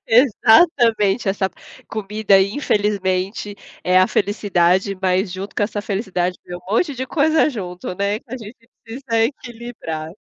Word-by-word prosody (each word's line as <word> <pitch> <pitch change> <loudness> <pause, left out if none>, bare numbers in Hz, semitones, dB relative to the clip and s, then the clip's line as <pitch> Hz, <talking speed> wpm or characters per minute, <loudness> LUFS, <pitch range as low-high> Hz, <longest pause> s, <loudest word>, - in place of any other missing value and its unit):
Exatamente! 230 - +4
Essa 195 0 0
p - - -23 0.3
comida, 210 -1 +2
infelizmente, 200 -2 -1 0.3
é 185 +1 +4
a 185 - +5
felicidade, 195 -1 +1
mas 185 0 +1
junto 190 +2 -7
com - - +1
essa 205 0 -2
felicidade, 190 -3 -2
vem 175 - -7
um - - -12
monte 285 +4 +1
de 260 +1 -4
coisa 315 +1 +2
junto, 180 -7 -6
né, 200 +2 -1
que - - -40
a - - -4
gente 230 0 -12 0.2
precisa 230 -1 -1
equilibrar. 230 - -6
205 Hz, 145 wpm, -20 LUFS, 190-230 Hz, 0.3 s, a